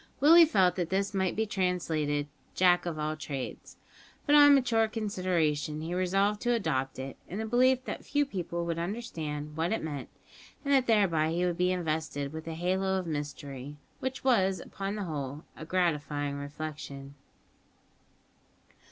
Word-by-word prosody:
Willie 330 +5 +8
felt 190 - +3
that 175 -2 -1
this 195 +2 0
might 190 -2 0
be 220 - +1
translated 165 -7 0 0.3
"jack 180 -1 +4
of 165 -2 -3
all 155 0 -2
trades," 140 -4 -6 0.5
but 290 - +3
on 290 -1 +9
mature 230 -4 +3
consideration 180 -9 -1
he 165 +2 -4
resolved 195 +3 +1
to 240 0 +2
adopt 135 - -1
it, 130 +1 -6
in 185 - -5
the 220 - -2
belief 255 +3 +3
that - - -5
few 290 0 +1
people 170 -7 -4
would 170 -1 -2
understand 160 -7 -4
what 165 +2 0
it 220 - -1
meant, 145 -4 -5 0.6
and 280 - +2
that 265 -2 +4
thereby 180 -9 +3
he 175 +2 0
would 175 -1 -1
be 180 0 +3
invested 155 -5 -2
with 160 +1 -7
a 165 - -4
halo 190 +3 0
of 185 - -3
mystery, 145 -2 -5 0.2
which 260 0 -4
was, 195 -8 +3
upon 195 +1 -5
the 210 - -3
whole, 145 -4 -5
a 155 - -8
gratifying 150 -5 0
reflection. 140 -1 -7
175 Hz, 160 wpm, -29 LUFS, 150-205 Hz, 0.6 s, on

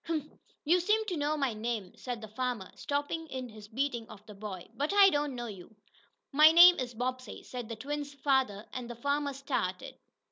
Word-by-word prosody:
"Huh! 325 -2 -1 0.4
You 345 +4 +4
seem 425 +5 +2
to 375 -4 -2
know 300 0 0
my 275 -5 0
name," 215 -3 -4
said 245 -3 -5
the 220 - -7
farmer, 235 -2 -3
stopping 290 +3 -3
in 260 -3 -6
his 215 -1 -12
beating 240 0 -2
of 210 0 -13
the 210 - -11
boy, 195 -3 -7
"but 285 +6 -1
I 400 -1 +7
don't 290 -3 -1
know 240 -1 -4
you." 205 -1 -10 0.6
"My 305 +2 +8
name 350 +2 +9
is 245 -2 -4
Bobbsey," 255 +2 -4
said 245 -3 -7
the 230 - -4
twins' 285 +4 -5
lather, 255 -7 +2
and 250 -2 -5
the 240 - -6
farmer 285 +3 -1
started. 255 -9 -3
255 Hz, 200 wpm, -31 LUFS, 225-290 Hz, 0.6 s, name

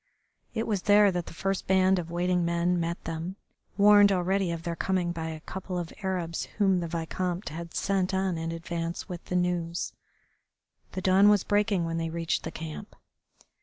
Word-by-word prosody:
It 225 0 0
was 205 -4 -1
there 205 0 +5
that 175 -2 -3
the - - -8
first 195 +2 -2
band 190 0 +4
of 170 -1 -5
waiting 175 +1 +1
men 170 +1 +1
met 170 +1 -3
them, 165 +3 -4 0.4
warned 205 0 +7
already 190 0 +1
of 165 -1 -4
their 170 0 -3
coming 180 -1 0
by 165 -1 -4
a 160 -1 -6
couple 185 +1 -5
of 175 -2 -4
Arabs 180 -4 -2
whom 195 -3 +3
the 170 - -3
Vicomte 175 +3 -3
had 170 +2 -7
sent 190 -2 +1
on 190 -1 0
in 165 0 -3
advance 165 0 -4
with 175 -2 -7
the 180 - -3
news. 175 -1 -1 1.0
The 185 - -3
dawn 190 +2 +5
was 205 -2 +4
breaking 205 -4 +1
when 165 0 -2
they 165 0 -2
reached 165 0 -1
the 160 - -4
camp. 160 +6 -8
180 Hz, 185 wpm, -28 LUFS, 170-190 Hz, 1.0 s, warned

